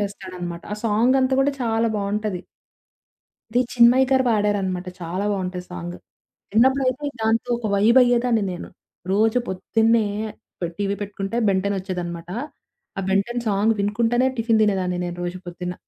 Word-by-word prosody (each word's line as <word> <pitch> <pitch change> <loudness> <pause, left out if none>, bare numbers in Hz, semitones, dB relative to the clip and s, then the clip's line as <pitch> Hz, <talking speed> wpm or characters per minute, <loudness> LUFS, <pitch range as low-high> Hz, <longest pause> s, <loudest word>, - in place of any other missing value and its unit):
చేస్తాడనమాట. 185 -4 -6
ఆ - - -8
సాంగ్ 230 +5 +3
అంతా 260 0 +2
కూడా 280 - +3
చాలా 225 0 +1
బావుంటది. 205 -2 -2 1.1
ఇది 240 +2 +2
చిన్మయ 245 +2 +6
గారు 260 -1 +4
పాడారనమాట 200 -4 0
చాలా 175 +4 -3
బావుంటది 185 -2 -3
సాంగు. 175 0 -6 0.5
చిన్నప్పుడైతే 260 +4 +2
దాంతో 225 +2 +1
ఒక 235 - -4
వైబయ్యేదాన్ని 235 +2 +4
నేను. 175 - -7 0.4
రోజు 220 +4 +3
పొద్దున్నే 220 +4 +2 0.6
పె 175 - 0
టీవీ 200 0 -1
పెట్టుకుంటే 200 +1 -4
బెంటెనొచ్చేదనమాట. 185 -3 -2 0.7
ఆ - - +1
బెన్ 195 +1 +3
టెన్ 240 0 -3
సాంగ్ 210 +2 +2
వినుకుంటనే 230 +5 +2
టిఫిన్ 225 -1 +2
దినేదాన్ని 185 -4 +1
నేను 175 0 -4
రోజు 175 +1 -4
పొద్దున్న. 180 0 -5
205 Hz, 130 wpm, -23 LUFS, 185-235 Hz, 1.1 s, చిన్మయ